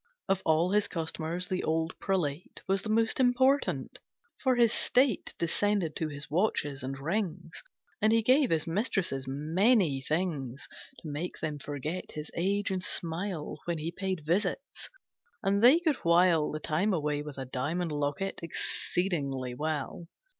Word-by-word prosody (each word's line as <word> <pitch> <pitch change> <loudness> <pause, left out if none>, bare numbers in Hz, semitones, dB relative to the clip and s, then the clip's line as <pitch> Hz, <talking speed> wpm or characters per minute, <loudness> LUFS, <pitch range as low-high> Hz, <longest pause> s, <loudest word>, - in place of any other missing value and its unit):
Of 190 -1 +1
all 160 +3 +3
His 210 0 +3
customers 165 +1 -3
the 185 - -2
old 160 +2 0
prelate 175 -5 -2
Was 195 0 +1
the 215 - -5
most 225 +2 +2
important, 260 +2 +2 0.4
for 260 -2 +3
his 235 -2 +4
state 250 -5 +2
Descended 175 -1 +1
to 160 - 0
his 145 -1 -6
watches 150 -5 0
and 135 +2 -4
rings, 170 +1 -3 0.4
And 215 +1 +4
he 225 0 +3
gave 260 +2 +4
his 160 -2 +1
mistresses 165 - -1
many 160 - +2
things 145 -5 -2 0.4
To - - -7
make 155 +4 -4
them 150 -2 -3
forget 150 +6 -5
his 150 0 -6
age 200 +4 0
and 185 -1 -2
smile 170 -1 -3
When 170 -1 -1
he 160 +2 -3
paid 185 -3 -3
visits, 190 - -1 0.5
and 200 +1 +2
they 255 +8 +8
could 315 -5 +1
while 170 -2 +4
The 155 - -4
time 175 +8 0
away 150 -2 -1
with 150 -2 -8
a 135 - -4
diamond 155 +7 -2
locket 145 +7 -2
Exceedingly 145 -6 -2
well. 155 +4 -3
170 Hz, 155 wpm, -30 LUFS, 150-200 Hz, 0.5 s, they